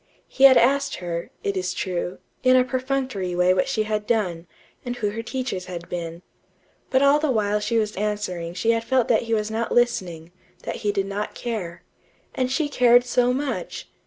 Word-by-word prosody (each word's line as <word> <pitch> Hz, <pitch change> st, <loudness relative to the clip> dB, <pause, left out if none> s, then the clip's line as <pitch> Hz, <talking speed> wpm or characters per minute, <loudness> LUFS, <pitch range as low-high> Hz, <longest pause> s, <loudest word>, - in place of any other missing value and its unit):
He 270 Hz, -, +4 dB
had 265 Hz, -1 st, +9 dB
asked 275 Hz, +4 st, +3 dB
her, 170 Hz, -2 st, -5 dB
it 200 Hz, -, -1 dB
is 185 Hz, -1 st, -2 dB
true, 180 Hz, 0 st, -3 dB, 0.2 s
in 255 Hz, 0 st, +5 dB
a 255 Hz, -, +6 dB
perfunctory 255 Hz, -7 st, -2 dB
way 180 Hz, +1 st, +4 dB
what 185 Hz, -, +1 dB
she 230 Hz, -5 st, 0 dB
had 210 Hz, -1 st, -2 dB
done, 180 Hz, -7 st, -1 dB, 0.4 s
and 245 Hz, -1 st, -4 dB
who 210 Hz, -4 st, -1 dB
her 225 Hz, +2 st, -4 dB
teachers 235 Hz, -6 st, -4 dB
had 175 Hz, -2 st, -7 dB
been. 170 Hz, 0 st, -5 dB, 0.7 s
But 265 Hz, 0 st, +3 dB
all 280 Hz, +1 st, +5 dB
the 310 Hz, -1 st, 0 dB
while 210 Hz, -4 st, +1 dB
she 210 Hz, +2 st, -1 dB
was 215 Hz, -1 st, 0 dB
answering 190 Hz, -5 st, -3 dB
she 225 Hz, +5 st, +2 dB
had 230 Hz, 0 st, 0 dB
felt 255 Hz, 0 st, +1 dB
that -, -, +4 dB
he 225 Hz, -, +3 dB
was 215 Hz, 0 st, -2 dB
not 225 Hz, +1 st, -2 dB
listening; 175 Hz, -9 st, 0 dB, 0.3 s
that -, -, -4 dB
he 210 Hz, -, -1 dB
did 195 Hz, -1 st, -1 dB
not 200 Hz, +2 st, -4 dB
care. 195 Hz, -8 st, -5 dB, 0.5 s
And 255 Hz, 0 st, -1 dB
she 295 Hz, +2 st, +1 dB
cared 245 Hz, -3 st, +5 dB
so 245 Hz, 0 st, +2 dB
much! 270 Hz, +1 st, -4 dB
215 Hz, 195 wpm, -23 LUFS, 185-250 Hz, 0.7 s, had